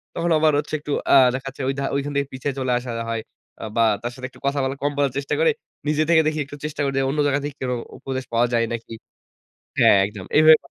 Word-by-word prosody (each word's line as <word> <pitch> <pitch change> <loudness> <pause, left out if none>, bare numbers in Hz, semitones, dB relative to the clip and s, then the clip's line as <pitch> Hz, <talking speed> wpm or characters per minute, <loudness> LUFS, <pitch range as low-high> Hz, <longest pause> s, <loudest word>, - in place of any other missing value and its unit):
তখন 170 - -1
আবার 155 0 +3
হচ্ছে 150 - -6
একটু 145 0 -7 0.2
আ - - +8 0.2
দেখাচ্ছে 135 +1 -6
ওইধা 135 0 -2
ওইখান 140 +1 -2
থেকে 140 -1 0
পিছায় 130 +2 -3
চলে 130 -1 -1
আসা 125 0 -6 0.2
হয়। 115 -1 -2 0.4
আ - - -6
বা 115 - +4 0.2
তার 120 +1 -3
সাথে 130 - -7
একটু - - -18
কথা 140 +1 +1
বলা 130 +1 -1
কম 145 - +1
বলার 140 -2 +2
চেষ্টা 140 - -2
করে 485 -1 +4 0.4
নিজে 150 +1 +2
থেকে 165 -1 +6
দেখি 155 0 -1
একটু 140 - -10
চেষ্টা 150 0 -4
করে 135 -1 0
দে - - +2
অন্য 145 +2 -2
জায়গা 140 0 +2
থেকে 145 -1 -5
কোনো 125 -1 -1 0.2
উপদেশ 130 -1 -4
পাওয়া 120 +1 +3
যায় 115 -1 +3
নাকি। 115 0 -6 0.9
হ্যাঁ। - - +6
একদম। 100 -2 -9
এইভাবে 155 +1 +8
140 Hz, 235 wpm, -22 LUFS, 130-150 Hz, 0.9 s, আ